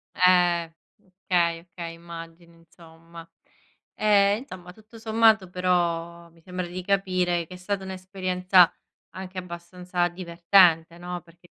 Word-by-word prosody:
Eh 175 Hz, -2 st, +3 dB, 0.3 s
okay, 180 Hz, -3 st, -1 dB
okay, 170 Hz, -1 st, -9 dB
immagini 170 Hz, 0 st, -12 dB
insomma. 165 Hz, 0 st, -15 dB, 0.7 s
Ehm, 205 Hz, 0 st, +3 dB
insomma, 180 Hz, -8 st, -11 dB
tutto 220 Hz, +2 st, -17 dB
sommato 220 Hz, -3 st, +3 dB
però 170 Hz, -2 st, -1 dB
mi 165 Hz, -, -23 dB
sembra 180 Hz, +1 st, -5 dB
di 180 Hz, +1 st, -7 dB
capire 185 Hz, -3 st, 0 dB
che 180 Hz, -, -11 dB
è -, -, -10 dB
stata 195 Hz, +2 st, -4 dB
un'esperienza 185 Hz, -1 st, +2 dB, 0.4 s
anche 190 Hz, 0 st, -9 dB
abbastanza 180 Hz, 0 st, -3 dB
divertente, 170 Hz, -1 st, +3 dB
no, 175 Hz, 0 st, -6 dB
perché 175 Hz, +1 st, -22 dB
180 Hz, 120 wpm, -25 LUFS, 170-185 Hz, 0.7 s, Eh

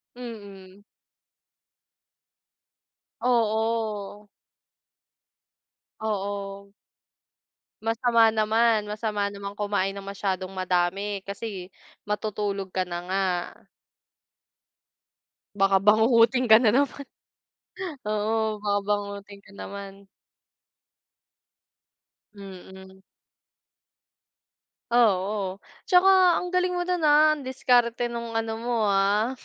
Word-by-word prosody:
Mm. 200 Hz, -5 st, -10 dB, 2.4 s
Oo. 220 Hz, -3 st, -1 dB, 1.7 s
Oo. 200 Hz, -1 st, -4 dB, 1.1 s
Masama 230 Hz, 0 st, +3 dB
naman 220 Hz, 0 st, +2 dB
masama 210 Hz, -1 st, -2 dB
naman 200 Hz, 0 st, -8 dB
kumain 205 Hz, -2 st, 0 dB
ng 195 Hz, -, -8 dB
masyadong 195 Hz, -1 st, -3 dB
madami, 185 Hz, +2 st, -1 dB
kasi 200 Hz, -2 st, -7 dB, 0.3 s
matutulog 205 Hz, -2 st, -3 dB
ka 185 Hz, 0 st, -2 dB
na 175 Hz, -1 st, -5 dB
nga. 195 Hz, 0 st, +1 dB, 2.3 s
Baka 195 Hz, 0 st, +4 dB
bangungutin 230 Hz, +4 st, +4 dB
ka 220 Hz, -, +8 dB
na 215 Hz, -, +5 dB
naman, 280 Hz, +3 st, 0 dB, 1.0 s
oo 215 Hz, +1 st, 0 dB
baka 205 Hz, -1 st, +1 dB
bangungutin 200 Hz, -1 st, -3 dB
ka -, -, -18 dB
naman. 200 Hz, 0 st, -9 dB, 2.3 s
Mm. 190 Hz, -1 st, -12 dB, 1.9 s
Ah, 240 Hz, -1 st, +6 dB
oo, 190 Hz, 0 st, -3 dB, 0.3 s
tsaka 370 Hz, -2 st, +5 dB
ang 360 Hz, 0 st, -3 dB
galing 365 Hz, 0 st, +1 dB
mo 355 Hz, -, -1 dB
dun, 360 Hz, 0 st, -1 dB
ah, 300 Hz, +1 st, +6 dB
ang 290 Hz, -4 st, -4 dB
diskarte 245 Hz, -2 st, +1 dB
nung 235 Hz, -1 st, -6 dB
ano 225 Hz, 0 st, -2 dB
mo, 235 Hz, -1 st, -1 dB
ah, 200 Hz, +4 st, +2 dB
210 Hz, 85 wpm, -25 LUFS, 195-230 Hz, 2.4 s, ka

